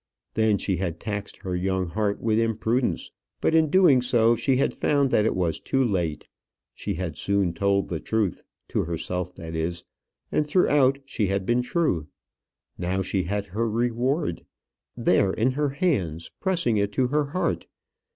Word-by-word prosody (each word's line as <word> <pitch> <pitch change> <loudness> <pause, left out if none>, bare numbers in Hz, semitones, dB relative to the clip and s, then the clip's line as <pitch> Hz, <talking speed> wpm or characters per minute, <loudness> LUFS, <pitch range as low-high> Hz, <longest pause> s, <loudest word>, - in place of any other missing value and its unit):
Then 110 -2 +3
she 95 -2 -1
had 85 -2 -3
taxed 100 -2 -4
her 90 -1 -2
young 95 0 -1
heart 105 +2 -1
with 110 -1 +1
imprudence 115 +2 0 0.3
but - - +1
in 160 -1 +4
doing 155 -7 +5
so 120 -2 +3
she 125 +3 +1
had 135 - +1
found 140 -2 +1
that 105 - +3
it - - +1
was 85 -4 0
too 135 0 +1
late. 85 -8 -1 0.5
She 100 - -4
had 85 -3 -4
soon 100 -3 0
told 100 +2 +1
the 85 - -3
truth 110 -3 -1 0.3
to - - 0
herself 90 +2 -3
that 80 0 -8
is; 85 +1 -2 0.5
and 150 - +1
throughout 145 -5 +4
she 110 -6 -1
had 95 0 -1
been 120 +3 +2
true. 125 - 0 0.7
Now 90 +2 -1
she 95 0 -1
had 100 +2 -2
her 110 +4 -2
reward; 120 +7 0 0.5
there 95 -1 +3
in 120 +4 +2
her 145 +2 0
hands, 110 - -1
pressing 170 - +1
it 100 0 +1
to 125 +3 +1
her 150 +1 +1
heart. 155 +6 -2
105 Hz, 170 wpm, -25 LUFS, 90-130 Hz, 0.7 s, doing